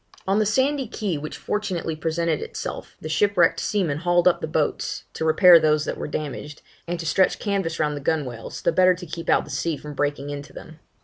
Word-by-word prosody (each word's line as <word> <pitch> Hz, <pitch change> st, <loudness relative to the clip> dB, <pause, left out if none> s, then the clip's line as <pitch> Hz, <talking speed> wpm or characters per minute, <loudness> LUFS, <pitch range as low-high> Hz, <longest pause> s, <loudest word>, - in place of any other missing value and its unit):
On 195 Hz, +2 st, +2 dB
the 215 Hz, -, +2 dB
sandy 265 Hz, +4 st, +1 dB
key 195 Hz, -8 st, -3 dB
which 155 Hz, +1 st, -6 dB
fortunately 185 Hz, -6 st, -2 dB
presented 160 Hz, 0 st, -1 dB
itself, -, -, -6 dB
the -, -, -5 dB
shipwrecked 175 Hz, +1 st, +3 dB
seamen 170 Hz, -9 st, -1 dB
hauled 175 Hz, +1 st, +3 dB
up 180 Hz, -, +3 dB
the -, -, -2 dB
boats, 155 Hz, -1 st, -1 dB
to -, -, -4 dB
repair 170 Hz, +2 st, +7 dB
those 155 Hz, -1 st, +2 dB
that -, -, -3 dB
were -, -, -5 dB
damaged, 150 Hz, 0 st, -6 dB, 0.2 s
and 175 Hz, 0 st, -3 dB
to 165 Hz, -, -5 dB
stretch 180 Hz, +4 st, +2 dB
canvas 195 Hz, -6 st, -2 dB
round 150 Hz, -1 st, 0 dB
the 145 Hz, -, -6 dB
gunwales, 135 Hz, -6 st, -3 dB
the -, -, +3 dB
better 185 Hz, 0 st, +4 dB
to 180 Hz, 0 st, -9 dB
keep 165 Hz, 0 st, -6 dB
out -, -, +3 dB
the 150 Hz, -, -10 dB
sea 150 Hz, +3 st, -1 dB
from 150 Hz, +1 st, -9 dB
breaking 145 Hz, 0 st, -2 dB
into 145 Hz, 0 st, -7 dB
them. 160 Hz, 0 st, -11 dB
165 Hz, 210 wpm, -23 LUFS, 150-185 Hz, 0.2 s, repair